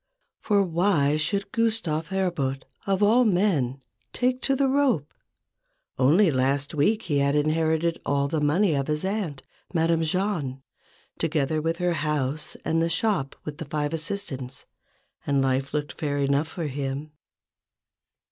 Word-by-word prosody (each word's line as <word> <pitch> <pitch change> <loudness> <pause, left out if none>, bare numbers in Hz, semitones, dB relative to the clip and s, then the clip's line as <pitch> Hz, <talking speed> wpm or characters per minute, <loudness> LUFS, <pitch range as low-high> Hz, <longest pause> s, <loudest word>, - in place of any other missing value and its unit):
For 205 -2 +2
why 170 -5 +2
should 200 +6 -1
Gustave 220 -9 0
Herbout, 175 -9 -1 0.2
of 195 +1 +2
all 230 +5 +5
men, 175 - +1 0.3
take 255 +1 0
to 270 - +1
the 275 0 +2
rope? 265 - +1 0.9
Only 160 +8 +5
last 135 +2 0
week 210 +10 +2
he 145 -5 0
had 140 +1 +2
inherited 160 +2 +1
all 140 0 +1
the 150 +1 -1
money 165 +5 +3
of 140 -1 -1
his 150 +3 -1
aunt, 190 -9 -3 0.3
Madame 165 0 +2
Jahn, 160 -6 -1 0.6
together 155 -1 0
with 165 +1 -1
her 180 -1 +1
house 150 -2 -2
and 165 0 +1
the 165 - +1
shop 165 -6 0
with 150 +1 -6
the 160 - -5
five 150 +1 -2
assistants, 150 -7 -4 0.6
and 140 -1 +2
life 135 +1 0
looked 150 -1 -2
fair 145 -2 -2
enough 140 +2 +1
for 165 0 -5
him. 140 +1 -4
155 Hz, 145 wpm, -25 LUFS, 140-190 Hz, 0.9 s, all